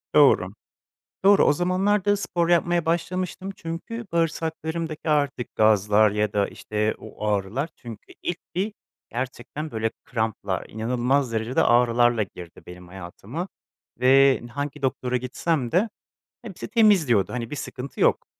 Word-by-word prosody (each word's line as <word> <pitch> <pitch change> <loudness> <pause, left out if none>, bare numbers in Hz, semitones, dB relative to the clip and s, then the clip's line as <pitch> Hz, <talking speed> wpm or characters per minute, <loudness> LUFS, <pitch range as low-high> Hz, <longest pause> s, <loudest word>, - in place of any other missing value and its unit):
Doğru. - - +6 0.8
Doğru, 200 0 +6
o - - +5
zamanlar 185 +5 +1
da 205 0 +3
spor 175 -3 -1
yapmaya 175 -1 +2
başlamıştım 180 +3 -2
çünkü 175 +8 -6
bağırsaklarımdaki 160 -1 -2
artık 145 -4 0
gazlar 105 0 +4
ya 105 0 0
da 100 -1 +1
işte 105 +1 -2
o 105 - -7
ağrılar 105 - -1
çünkü 115 -3 -11
ilk 175 0 -2 0.2
bir 200 +4 -1 0.4
gerçekten 130 +5 -5
böyle 110 0 -1
kramplar, 110 -5 -2
inanılmaz 125 +3 0
derecede 115 +3 +1
ağrılarla 120 -1 +4
girdi 90 -3 -10
benim 90 0 -11
hayatıma 95 - -7 0.5
ve 135 +1 +5
hangi 145 +1 -4
doktora 125 -1 0
gitsem 125 +1 -1
de 200 +6 +3 0.5
hepsi 205 -6 -8
temiz 210 - +4
diyordu, 100 -5 +2
hani 120 -2 -4
bir 150 - -4
sıkıntı 135 0 -7
yok. - - +3
135 Hz, 135 wpm, -24 LUFS, 110-170 Hz, 0.8 s, Doğru